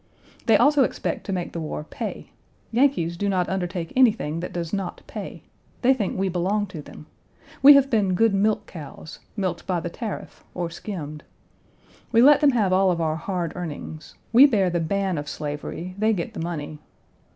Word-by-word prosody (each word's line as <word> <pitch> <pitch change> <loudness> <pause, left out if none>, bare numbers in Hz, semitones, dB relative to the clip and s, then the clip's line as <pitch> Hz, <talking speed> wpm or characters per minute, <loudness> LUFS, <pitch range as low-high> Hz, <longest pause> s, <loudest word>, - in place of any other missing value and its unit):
They - - +6
also 290 -1 +4
expect - - -3
to - - -2
make 180 -2 -3
the 170 - -4
war 155 -1 -4
pay. - - -6 0.4
Yankees 230 -9 +2
do 200 +3 -1
not 185 -2 +1
undertake 180 -3 -3
anything 220 - +3
that 180 - -5
does 170 -2 -4
not 195 -3 -3
pay. - - -8 0.4
They 260 +2 +6
think 210 -8 -2
we 195 +1 +1
belong 190 +4 0
to 155 - -6
them. 150 - -12 0.6
We 285 +2 +11
have 275 -1 +4
been 200 -5 +2
good 225 +2 +3
milk 205 +2 +1
cows 155 -1 -10 0.2
milked 185 -4 -2
by 180 -2 0
the 170 +1 -5
tariff, 220 +1 -7
or 175 -2 -3
skimmed. 155 -6 -7 0.9
We 230 0 +5
let 290 +3 +7
them 285 -3 +5
have 205 -6 +2
all 190 0 +4
of 175 -2 0
our 160 -1 0
hard 175 -1 -3
earnings. 160 -2 -7 0.2
We 265 +5 +9
bear 200 -8 +2
the 175 - 0
ban 190 +1 -1
of 150 0 -6
slavery; 150 +5 -5
they 220 +1 +3
get 175 -5 -4
the - - -7
money. 155 -3 -5
185 Hz, 185 wpm, -24 LUFS, 165-215 Hz, 0.9 s, We